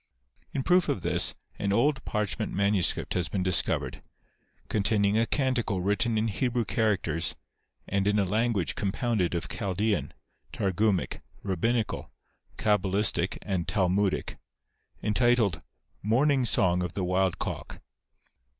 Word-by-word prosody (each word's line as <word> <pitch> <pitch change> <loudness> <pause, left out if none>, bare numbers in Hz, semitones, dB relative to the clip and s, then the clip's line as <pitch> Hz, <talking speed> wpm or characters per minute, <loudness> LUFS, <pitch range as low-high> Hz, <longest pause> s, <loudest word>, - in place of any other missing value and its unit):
In 135 - -2
proof 180 +2 +3
of 95 - -1
this, - - +1 0.2
an 100 - 0
old 135 +6 +2
parchment 105 -2 -2
manuscript 100 -2 +1
has 90 -1 -1
been 95 -3 -1
discovered, 90 -1 +1 0.7
containing 100 0 +2
a 115 +1 +2
canticle 125 -8 0
written 105 +4 +1
in 110 +1 +1
Hebrew 120 +2 0
characters, 95 -8 0 0.5
and 100 0 0
in 105 0 +2
a 100 - +3
language 110 -1 0
compounded 100 -3 -1
of 85 - -2
Chaldean, 100 +2 -1 0.4
Targumic, 100 0 0 0.3
Eabbinical, 110 +4 -1 0.5
Cabalistic 100 -3 +1
and 95 -4 -2
Talmudic, 95 +1 0 0.7
entitled 115 -4 +2 0.2
" - - -43
Morning 135 +1 +3
Song 90 -5 +3
of 90 -2 -3
the 95 - -2
Wild 90 0 +1
Cock." - - -5
100 Hz, 125 wpm, -28 LUFS, 95-115 Hz, 0.7 s, proof